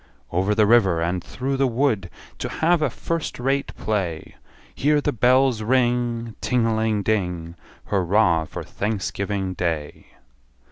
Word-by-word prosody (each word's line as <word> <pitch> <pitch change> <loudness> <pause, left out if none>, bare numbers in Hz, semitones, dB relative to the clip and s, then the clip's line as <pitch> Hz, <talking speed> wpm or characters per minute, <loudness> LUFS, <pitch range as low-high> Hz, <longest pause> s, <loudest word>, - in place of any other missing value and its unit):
Over 95 +4 +1
the 110 -1 +4
river, 100 -7 +4
and 85 +2 -1
through 130 +8 -3
the 135 0 +3
wood, 115 -7 0 0.3
To - - -3
have 170 +1 +2
a 150 - +2
first 165 +6 -4
rate 135 +2 0
play 95 -7 -3 0.4
Hear 150 +1 +2
the 145 - 0
bells 125 0 +3
ring 120 -1 0
Ting 125 -2 +1
a 115 -1 +1
ling 110 -2 0
ding, 90 -5 -1 0.4
Hurra 90 -4 +2
for - - -6
Thanksgiving 100 -2 -3
Day! 80 -4 -3
110 Hz, 140 wpm, -23 LUFS, 95-125 Hz, 0.4 s, the